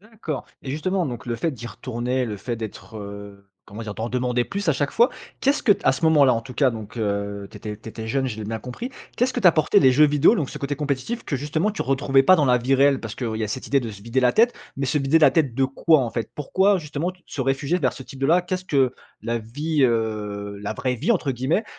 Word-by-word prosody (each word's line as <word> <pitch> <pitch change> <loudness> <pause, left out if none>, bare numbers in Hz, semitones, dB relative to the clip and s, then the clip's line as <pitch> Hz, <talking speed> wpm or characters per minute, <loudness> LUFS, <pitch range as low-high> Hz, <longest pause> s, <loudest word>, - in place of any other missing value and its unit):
D'accord. 210 - -6 0.2
Et 130 - -5
justement, 175 +4 -1
donc, 120 -1 -6
le 120 -1 -2
fait 165 - -1
d'y 120 -4 -8
retourner, 125 +1 -2
le 105 -3 -4
fait 120 +4 -4
d'être, 110 -1 -8
heu, 100 -1 -9 0.2
comment 110 +3 -8
dire? 105 -2 -6
D'en 110 - -4
redemander 125 0 0
plus 200 +2 -4
à - - +5
chaque 140 +1 -1
fois, 235 +2 +4 0.3
qu'est-ce 275 +2 +2
que 210 - +6
t - - -7
à - - +5
ce 130 +5 -3
moment-là, 145 -6 +5
en 115 - -1
tout 125 +2 -11
cas, 135 -3 +3
donc, 110 0 -8
heu, 100 -2 -2
tu - - -12
étais 105 -1 -6
tu 110 - -11
étais 110 0 -7
jeune, 135 +2 0
je 110 -4 -4
l'ai 110 - -6
bien 110 +1 -3
compris, 125 - -6 0.3
qu'est-ce 250 +2 +1
que 245 - -2
t'apportaient 175 +1 +5
les 130 -8 +5
jeux 150 +3 +6
vidéo, 150 +9 +4
donc 150 - -2
ce - - -7
côté 140 +1 -2
compétitif 145 - -3
que, 140 - -2
justement, 155 +9 -1
tu 210 - -3
retrouvais 135 +1 +3
pas 185 - +7
dans 150 - +3
la 125 -2 +4
vie 130 +3 +1
réelle? 135 0 +4
Parce 110 -2 -6
qu'il 115 -4 -3
y 110 - -1
a 105 - -4
cette 130 - -5
idée 140 0 +2
de 115 -2 -5
se 100 -1 -11
vider 115 +3 0
la 125 -1 +4
tête, 235 +2 +4 0.2
mais 135 -1 -1
se 150 - +1
vider 140 +4 +3
la 155 - +6
tête 140 -8 +1
de 135 0 +2
quoi, 150 +3 +3
en 120 -3 -2
fait? 115 - -4
Pourquoi, 190 +7 +2
justement, 150 +2 -3
tu 180 - -25
te 140 - -6
réfugiais 140 +6 0
vers 130 -6 +1
ce 130 - -9
type 135 - -12
de 135 - +2
là? 175 +4 +5
Qu'est-ce 185 +1 -3
que 135 -6 +2 0.3
la 115 +2 -2
vie, 145 +7 -2
heu, 105 -3 -2
«la 100 - -2
vraie 125 0 -1
vie», 235 - +1
entre 155 -9 0
guillemets, 135 - 0
130 Hz, 275 wpm, -23 LUFS, 115-155 Hz, 0.3 s, pas